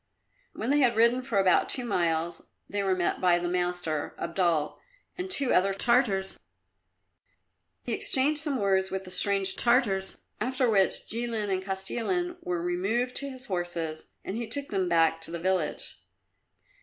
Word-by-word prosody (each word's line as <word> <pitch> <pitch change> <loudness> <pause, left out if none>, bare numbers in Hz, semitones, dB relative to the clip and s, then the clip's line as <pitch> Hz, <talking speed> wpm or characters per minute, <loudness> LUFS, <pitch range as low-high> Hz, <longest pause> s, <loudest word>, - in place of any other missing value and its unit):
When 230 +5 -2
they 290 - +3
had 245 -4 +3
ridden 235 +3 +4
for 250 -5 -3
about 190 -2 +3
two 250 - +2
miles 170 -5 -1 0.2
they 205 0 -2
were 190 -1 +1
met 175 -2 -1
by 180 -1 +4
the 175 0 -2
master, 175 -4 -2
Abdul, 170 -3 -1 0.4
and 365 +1 -5
two 280 -8 +3
other 195 +1 +3
Tartars. 205 -4 +1 1.4
He 240 - -2
exchanged 285 +6 0
some 295 -4 -2
words 190 -2 +1
with 190 0 -4
the 185 - -10
strange 195 0 +2
Tartars, 235 -6 +2 0.2
after 255 +3 0
which 195 -4 +2
Jilin 225 -3 -1
and 190 0 0
Kostilin 235 - -2
were 175 -1 -3
removed 200 +8 -1
to 280 - -4
his 260 -1 -7
horses 175 -5 -3 0.2
and 190 - -4
he 235 -1 -4
took 280 +5 0
them 190 -3 -1
back 165 -1 +3
to - - 0
the 170 - -4
village. 180 -2 -2
195 Hz, 160 wpm, -28 LUFS, 175-240 Hz, 1.4 s, ridden